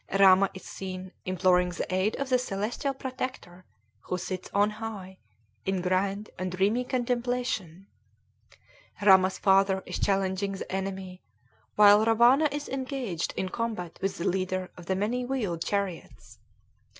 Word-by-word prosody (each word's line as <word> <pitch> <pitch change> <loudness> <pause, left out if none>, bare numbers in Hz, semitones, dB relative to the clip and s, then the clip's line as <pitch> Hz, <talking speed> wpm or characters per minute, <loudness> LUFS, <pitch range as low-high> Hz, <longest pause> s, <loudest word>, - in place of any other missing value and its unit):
Rama 195 0 +7
is 190 - -9
seen 185 -1 -7
imploring 185 -1 +3
the 180 +1 -4
aid 185 +4 +1
of 275 -1 -3
the 255 -1 +3
celestial 240 +5 -2
protector, 255 -9 -6 0.4
who 180 - -2
sits 185 0 -5
on 205 +1 +3
high, 210 -4 -7 0.4
in 190 -1 -1
grand 195 +3 -1
and 185 0 -2
dreamy 200 +7 +1
contemplation. 245 - -2 1.2
Rama's 190 -1 +6
father 195 -1 +3
is - - -5
challenging 195 0 0
the 195 - -7
enemy, 190 -1 -4 0.5
while 210 0 +7
Rawana 240 +7 +5
is 290 0 -4
engaged 260 - -3
in 185 - -1
combat 215 -6 -4
with 195 0 -1
the 170 - -2
leader 185 0 -1
of 175 -1 -12
the 190 - +1
many 225 +6 -1
wheeled 215 -11 -2
chariots. 200 -4 -4
195 Hz, 140 wpm, -28 LUFS, 185-230 Hz, 1.2 s, Rama